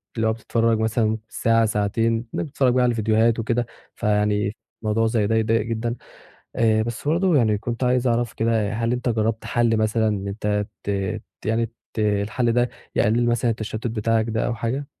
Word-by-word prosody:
اللي 115 -1 +1
هو 110 - +2
بتتفرج 115 0 0
مثلًا 110 0 +1
ساعة 115 0 +2
ساعتين 110 +2 +1 0.2
إنك - - -1
بتتفرج 135 -4 +1
بقى 125 0 +3
على 120 -1 +3
فيديوهات 110 +1 +2
وكده 120 +2 0 0.3
فيعني 105 -1 +1 0.3
الموضوع 110 +1 +1
زي 110 -2 +1
ده 115 - +1
يضايق 110 0 +2
جدًا 115 +1 -2 0.6
آآ، 110 -1 +3
بس 120 +5 -4
برضه 170 +1 +3
يعني 110 -5 +3
كنت 120 +3 -3
عايز 125 0 +2
أعرف 120 -1 +1
كده 115 -2 0
هل 115 +1 0
أنت 125 0 -1
جرّبت 110 -1 0
حلّ 120 -2 +2
مثلًا 110 0 +1
إن 100 -2 -2
أنت 105 0 -1 0.2
ت - - -8 0.6
يعني 115 +1 0 0.2
ت - - -8
الحلّ 105 +3 +1
ده 120 +1 +2 0.2
يقلل 120 +3 +2
مثلًا 120 0 +1
التشتت 110 0 -4
بتاعك 115 0 +1
ده 110 0 0
أو 120 - -1
حاجة؟ 125 +5 -3
115 Hz, 180 wpm, -23 LUFS, 110-120 Hz, 0.6 s, بقى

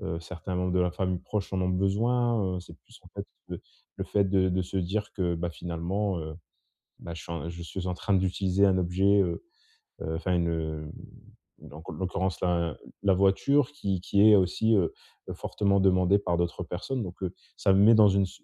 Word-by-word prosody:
heu, - - -4
certains 90 +2 -6
membres 90 0 -1
de 90 - +2
la 90 -1 +1
famille 90 0 -2
proche 105 0 -4
en 95 - 0
ont 90 - 0
besoin, 105 +2 +1
heu. - - -3
C'est - - -14
plus, - - -19
en - - -15
fait, - - -7 0.2
le - - -5 0.4
le - - -2
fait 100 - +2
de 95 -1 +2
de 95 0 0
se 90 +2 -4
dire 100 +4 -2
que, 90 -3 -1
bah, 85 +1 -2
finalement, 85 +4 -3
heu, 80 0 -6 0.7
bah, 85 - -7
je 80 - -8
suis - - -7
un 85 0 -4
je 85 0 -8
suis 85 +3 -6
en 90 - -1
train 100 +2 -1
d'utiliser 95 +1 +1
un 95 -1 +3
objet, 95 +3 +3
heu 90 -3 -1 0.6
heu, 80 0 -3
enfin, 90 +2 -1
une 85 -1 +1
hem, 80 -2 -3 0.7
donc, 75 +1 -12
en - - -5
l'occurrence, 95 +1 -2
là, 85 -3 0 0.3
la 100 -1 +4
voiture 120 +9 +3
qui 100 -11 -3
qui 100 +2 +1
est 105 - +8
aussi, 100 +4 +2
heu 90 -5 +2 0.4
heu, - - -3
fortement 100 -1 0
demandée 95 0 +4
par 90 -3 -1
d'autres 85 +1 -2
personnes, 110 +9 -4
donc, 90 -1 -9
heu, 90 - -2 0.2
ça - - +2
me 95 - +4
met 110 +2 +8
dans 110 -1 +7
une 100 0 +2
si 95 - -13
95 Hz, 220 wpm, -28 LUFS, 85-100 Hz, 0.7 s, est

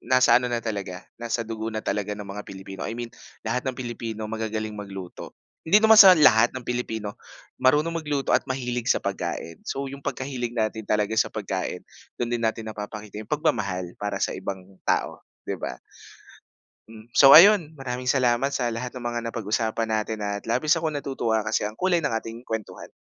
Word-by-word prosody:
nasa 130 -2 +5
ano 125 0 +1
na 120 - +1
talaga, 100 -5 -4 0.2
nasa 120 0 -2
dugo 110 0 -4
na 110 - -2
talaga 105 -1 -2
ng 105 - -7
mga 100 +1 -6
Pilipino, 95 0 -9
I - - -3
mean 120 -1 -4 0.4
lahat 125 +3 0
ng 130 -1 -2
Pilipino 115 -3 -5
magagaling 110 -1 -3
magluto. 95 -3 -8 0.3
Hindi 195 +6 +5
naman 220 0 +7
sa 195 -3 +11
lahat 120 -8 +6
ng 130 - -5
Pilipino 110 -4 -3 0.4
marunong 150 +6 +2
magluto 145 -2 -2
at - - -2
mahilig 125 -2 -3
sa - - +4
pagkain. 85 -4 -4
So 140 +1 -3
yung 140 +1 -9
pagkahilig 130 -3 -3
natin 110 0 -1
talaga 105 +1 0
sa - - +2
pagkain, 95 -3 -3 0.4
dun 120 - 0
din 120 - -2
natin 110 0 -1
napapakita 105 0 -7
yung 110 - -18
pagmamahal 100 - -1
para 105 0 -3
sa - - 0
ibang 95 - -4 0.3
tao, - - 0 0.3
'di - - 0
ba? - - -5 1.1
Hmm, 110 0 -14
so 135 -1 +9
ayun, 175 -2 +8
maraming 130 -3 -5
salamat 130 0 +2
sa 125 - 0
lahat 120 +2 -5
ng 125 - -7
mga 120 0 -2
napag-usapan 110 +1 -1
natin 110 0 -1
at 100 0 -3
labis 150 +8 +2
akong 160 -1 -2
natutuwa 135 -6 -1
kasi 110 +1 -1
ang 105 - -4
kulay 185 -1 +3
ng 130 - 0
ating 115 +1 -5
kuwentuhan. 110 -2 -6
115 Hz, 180 wpm, -25 LUFS, 105-130 Hz, 1.1 s, sa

